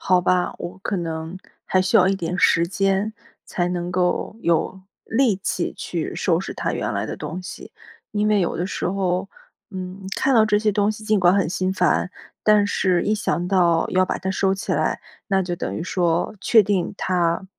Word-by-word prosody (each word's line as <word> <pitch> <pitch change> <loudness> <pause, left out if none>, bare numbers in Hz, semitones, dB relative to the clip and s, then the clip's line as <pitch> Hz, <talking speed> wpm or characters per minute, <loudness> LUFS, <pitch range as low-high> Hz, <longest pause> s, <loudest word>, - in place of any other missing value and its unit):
好 180 -1 +3
吧， 180 0 +1
我 180 +2 -7
可 200 +1 -3
能 165 0 -4 0.3
还 185 - +2
需 195 +5 +3
要 185 -3 +6
一 195 - +2
点 180 -1 -3
时 170 -1 +4
间， 195 +2 0 0.3
才 175 - -2
能 175 0 -3
够 180 +3 0
有 170 +3 0 0.2
力 230 -2 +2
气 - - -2
去 - - -4
收 - - +1
拾 - - -5
他 - - -2
原 - - -2
来 - - -1
的 - - -5
东 180 +3 -6
西。 180 - -9 0.4
因 210 0 +1
为 210 -2 +3
有 175 - -1
的 175 - -1
时 190 - -3
候， 185 0 -1 0.4
嗯， 190 0 -7
看 270 - +2
到 220 -3 +5
这 210 - +3
些 210 0 +2
东 205 +1 +1
西 215 0 -7
尽 215 -1 +2
管 180 0 +4
很 195 -5 +2
心 185 0 -1
烦， 180 0 +1 0.3
但 210 -1 +5
是 185 -3 +1
一 210 - 0
想 180 -4 -1
到 175 -4 +3
要 185 0 +3
把 - - -2
它 190 - -3
收 190 0 +1
起 190 - -3
来， - - 0 0.3
那 195 -3 +2
就 175 -1 -3
等 - - -4
于 - - -3
说 175 -1 0
确 220 -3 +5
定 195 -1 -1
他 175 -1 0
185 Hz, 220 characters per minute, -22 LUFS, 175-200 Hz, 0.4 s, 要